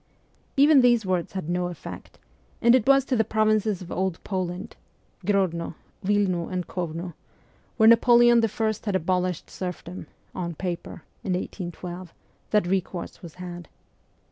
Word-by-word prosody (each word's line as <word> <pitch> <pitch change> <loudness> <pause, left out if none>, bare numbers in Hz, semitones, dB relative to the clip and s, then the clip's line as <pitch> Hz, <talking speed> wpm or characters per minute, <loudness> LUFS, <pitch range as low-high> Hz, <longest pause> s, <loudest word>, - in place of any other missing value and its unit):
Even 285 0 +7
these 240 -3 +4
words 185 -2 -1
had 190 -5 -4
no 180 +1 0
effect, 175 - -9 0.4
and 235 - +5
it 255 -2 +3
was 275 -1 +5
to 260 - 0
the 225 - +3
provinces 215 -2 +1
of 170 - -11
Old 185 -2 -1
Poland 185 +2 -4 0.5
Grodno, 185 -5 0 0.3
Wilno, 190 -4 +1
and 180 -1 -2
K6vno 175 0 -4 0.6
where 220 - +6
Napoleon 240 0 +6
I. 220 0 +1
had 205 -3 -1
abolished 180 0 -1
serfdom 180 -2 -6 0.3
(on 170 -2 -4
paper) 175 -1 -5 0.2
in 185 - -1
1812, 180 -1 -6 0.3
that 210 -3 +3
recourse 185 -1 -3
was 170 -3 -10
had. 175 -2 -8
185 Hz, 140 wpm, -25 LUFS, 175-220 Hz, 0.6 s, Even